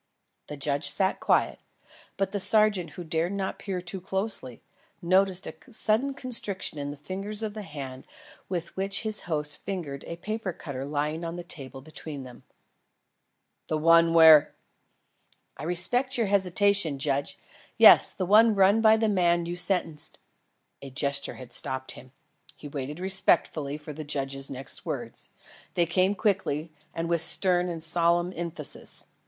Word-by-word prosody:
The 150 - -7
judge 140 +1 0
sat 190 +3 +1
quiet, - - +1 0.6
but 195 -1 -1
the 205 - -2
sergeant 210 -3 +3
who 175 - -7
dared 165 +3 -1
not 195 -1 -3
peer 190 -3 -4
too 180 +2 -7
closely, 190 - -4 0.4
noticed 185 +1 +2
a - - -6 0.2
sudden 225 +5 0
constriction 215 - 0
in 145 0 -4
the 145 - -7
fingers 195 +7 -5
of 215 -1 -3
the 215 - -6
hand 140 -7 -8 0.4
with 175 -2 -4
which 195 +1 +1
his 215 -1 -2
host 150 -2 -1
fingered 165 -8 -5
a 170 - -6
paper 205 +1 -4
cutter 135 -4 -6
lying 150 +3 -2
on 165 0 -4
the 175 - -6
table 135 -6 -7
between 150 -1 -7
them. 125 -1 -12 1.3
"The 155 - -1
one 165 +1 +4
where 160 -3 +7 0.5
" - - -36
"I - - -7
respect 245 +11 +3
your 230 - +1
hesitation, 195 -4 +2
judge. 140 0 -2 0.4
Yes, - - +8
the 185 - -3
one 215 +3 +5
run 200 +3 +4
by 220 0 +6
the 220 0 +1
man 175 -4 +2
you 175 +1 -4
sentenced 170 -4 -2 0.3
" - - -49
A 140 - -8
gesture 140 +2 -2
had 125 -2 -9
stopped 130 +2 -1
him. 130 0 -12 0.4
He 150 - -10
waited 145 +2 -6
respectfully 170 -6 +2
for 150 0 -9
the 155 +2 -7
judge's 135 -1 -3
next 135 0 -7
words. - - -6 0.5
They 170 - +3
came 185 +4 +1
quickly 180 -6 -1 0.2
and 165 0 -4
with 170 -1 +1
stern 180 +1 +2
and 165 -2 -4
solemn 170 +2 +1
emphasis. 165 -3 -5
170 Hz, 160 wpm, -27 LUFS, 150-195 Hz, 1.3 s, Yes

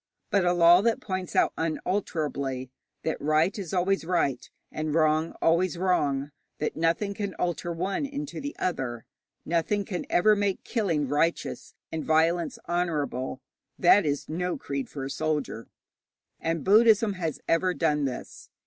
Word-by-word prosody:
But 200 -2 +3
a 175 - +3
law 175 +1 +7
that 230 +1 +1
points 185 -3 -4
out - - +3
unalterably 150 -6 -2 0.3
that 160 - -2
right 155 +5 +2
is 185 -5 -5
always 190 +1 +1
right, 165 -6 0 0.2
and 155 0 -2
wrong 155 0 +2
always 170 +2 +2
wrong, 145 -6 +1 0.3
that 150 - -2
nothing 170 +5 0
can 200 -1 -4
alter 175 0 -2
one 190 - -2
into 285 +1 -5
the 285 +1 -5
other, 125 -10 -3 0.4
nothing 170 +5 0
can 180 -3 -4
ever 210 +4 +4
make 200 -2 -1
killing 170 - 0
righteous 150 +5 -1 0.2
and 160 -1 -3
violence 165 +2 +2
honourable, 150 -7 -2 0.4
that 190 +3 +6
is 145 -2 -2
no 180 +3 -2
creed 140 -1 -4
for 135 -2 -5
a - - -4
soldier. 150 -5 -2 0.7
And 165 -1 -2
Buddhism 220 +1 +5
has 165 -5 -3
ever 180 +2 +2
done 150 -3 +1
this. 130 -2 -6
170 Hz, 150 wpm, -27 LUFS, 150-185 Hz, 0.7 s, law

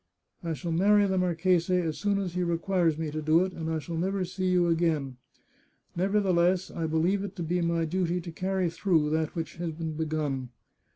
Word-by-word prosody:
I 165 -1 -2
shall 170 +2 -4
marry 205 +5 +4
the 190 -1 +1
marchese 180 0 +2
as 165 -3 -2
soon 205 -1 +1
as 190 -3 -3
he 180 - -1
requires 170 -1 +1
me 160 -2 -3
to 155 +1 -3
do 155 +2 +4
it, 190 - -6
and 160 -1 -4
I 160 - 0
shall 165 +2 -5
never 190 +2 -1
see 185 +1 -3
you 180 -1 +3
again. 160 -6 0 0.4
" - - -39
Nevertheless, 185 -1 +2
I 165 -1 -3
believe 165 +5 +1
^ - - -4
it 200 -1 -6
to 175 - -4
be 175 +2 0
my 170 -1 +1
duty 180 +1 0
to 170 0 -7
carry 185 +2 -1
through 165 -5 +1
that 160 0 -1
which 165 -1 -5
has 170 -1 -3
been 160 0 -4
begun. 150 -5 -2
170 Hz, 215 wpm, -28 LUFS, 160-185 Hz, 0.4 s, marry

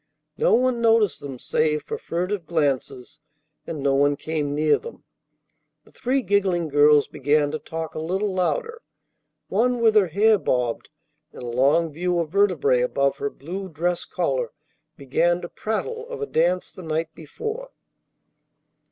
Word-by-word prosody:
No - - +4
one 250 0 +1
noticed 225 -4 +3
them 140 -2 -7
save 150 +4 0
for - - -4
furtive 180 +1 -3
glances, 145 -3 -2 0.5
and 155 -4 -5
no 140 -1 +2
one 145 +1 +3
came 150 -1 -3
near 150 0 +3
them. 470 - -11 0.8
The - - -22
three 260 +2 -1
giggling 185 -4 +1
girls 145 0 +5
began 145 +1 +1
to 155 - -3
talk 160 -1 -6
a - - -5
little 190 +5 -1
louder. 460 - -1 0.7
One 245 +4 +1
with 225 -2 +4
her 210 -3 +5
hair 210 +5 +3
bobbed 125 -6 -1 0.4
and - - -9
a 120 -1 -5
long 155 +6 +3
view 175 +3 -1
of 165 -3 -2
vertebrae 175 -10 +3
above 140 +2 +1
her 140 - -2
blue 185 +8 -7
dress 175 +2 -1
collar - - -1 0.5
began 170 +6 +1
to 175 - -7
prattle 460 - -4
of 475 -2 -6
a 435 - -2
dance 180 - 0
the - - -10
night 160 -1 -2
before. 445 - -6
170 Hz, 155 wpm, -23 LUFS, 145-210 Hz, 0.8 s, girls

